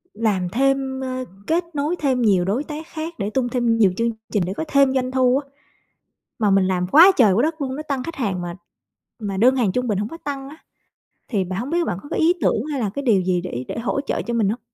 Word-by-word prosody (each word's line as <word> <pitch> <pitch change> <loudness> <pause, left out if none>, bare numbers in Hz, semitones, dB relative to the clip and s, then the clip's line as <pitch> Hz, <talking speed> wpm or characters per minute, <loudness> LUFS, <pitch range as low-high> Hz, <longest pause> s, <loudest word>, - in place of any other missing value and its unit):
Làm 205 -5 0
thêm, 265 +4 0
ơ, 255 -1 -3 0.2
kết 335 +2 +2
nối 295 +4 -1
thêm 270 -6 0
nhiều 195 -6 +3
đối 215 +9 0
tác 310 +1 -7
khác 325 0 -6
để 200 0 -1
tung 245 +2 -1
thêm 240 -2 +1
nhiều 205 -4 +4
chương 230 0 +1 0.2
trình 205 -4 +2
để 185 - -3
có - - -1
thêm 275 -2 +3
doanh 255 -1 0
thu 260 0 +3
á. 275 0 -6 0.9
Mà 210 -3 +2
mình 195 -1 +4
làm 180 -1 0
quá 330 - +8
trời 220 -6 +5
quá 210 +6 +2
đất 315 +2 -1
luôn, 265 -2 -3
nó 305 - -4
tăng 275 -3 -1
khách 330 +5 -6
hàng 200 -8 -2
mà 175 0 -5 0.7
mà 200 -3 -3
đơn 250 +6 +4
hàng 225 -7 +1
trung 250 +3 -1
bình 205 -3 0
hổng 210 +1 -2
có 330 - -8
tăng 275 -2 -4
á. 305 +3 -12 0.7
Thì 205 -6 0
bạn 185 +1 -4
hổng 250 +4 -4
biết 340 +1 +1
bạn 175 - -2
có 290 - -12
cái - - -2
ý 330 +2 +4
tưởng 220 - +1
hay 280 - -2
là 215 -4 0
cái 280 +8 -5
điều 220 -8 +3
gì 180 -1 0
để 130 -8 -5
để - - -4
hỗ 230 +4 -1
trợ - - -2
cho 235 - -4
mình 220 -4 +2
hông? 225 +4 -2
250 Hz, 265 wpm, -22 LUFS, 200-275 Hz, 0.9 s, quá